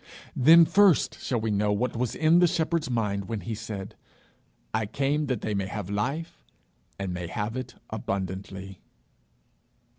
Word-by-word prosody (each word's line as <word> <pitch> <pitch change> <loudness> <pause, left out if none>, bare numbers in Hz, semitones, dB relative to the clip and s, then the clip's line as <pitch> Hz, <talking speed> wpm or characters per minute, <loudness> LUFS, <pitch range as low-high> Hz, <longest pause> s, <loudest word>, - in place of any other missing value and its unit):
Then 165 +6 +8
first 200 -2 +4
shall 120 - -1
we 110 0 -1
know 105 0 +1
what 120 +5 -1
was 120 0 -1
in 160 +2 +4
the 175 - +6
Shepherd's 165 -3 0
mind 105 -5 -1
when 110 -3 -3
he 115 - -4
said, 100 -2 -6 0.8
'I 110 -1 0
came 140 +6 0
that 130 -2 -1
they 110 - -2
may 100 -1 -1
have 100 0 -5
life, 135 +11 -3 0.5
and 95 -2 -3
may 90 -1 -4
have 105 +5 -3
it 130 0 -5 0.2
abundantly.' 95 -2 -5
110 Hz, 155 wpm, -27 LUFS, 100-140 Hz, 0.8 s, Then